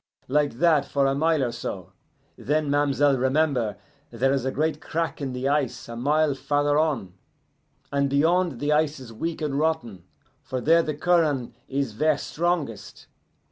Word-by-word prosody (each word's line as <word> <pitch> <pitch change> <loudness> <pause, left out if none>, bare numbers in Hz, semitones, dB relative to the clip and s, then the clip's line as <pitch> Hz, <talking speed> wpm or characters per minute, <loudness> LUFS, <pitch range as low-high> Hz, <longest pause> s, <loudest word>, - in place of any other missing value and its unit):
Like 145 +2 +1
that 155 +1 +3
for 140 -1 +1
a 135 - +2
mile 155 0 +2
or 120 - -1
so; 95 -6 -6 0.4
then 150 +1 -1
ma'm'selle 145 -1 +2
remember 130 -4 +1 0.3
there 130 +3 +1
is 135 -2 -1
a 130 - 0
great 155 +1 -1
crack 165 -3 -3
in 135 -2 -3
the 125 +1 -3
ice 135 -5 -1
a 115 - -7
mile 145 +4 +2
farther 145 +2 +1
on, 140 - -1 0.8
and 140 0 +1
beyond 160 0 +2
the 145 +1 0
ice 150 -1 +1
is 120 -3 -10
weak 165 +7 -4
and 140 -2 -1
rotten, 135 - -2 0.4
for 130 -2 -4
there 165 +6 +4
the 155 -2 -3
curren' 150 -7 +1
is 135 -3 -2
ver' 155 +5 +2
strongest. 160 - -3
145 Hz, 165 wpm, -25 LUFS, 130-155 Hz, 0.8 s, there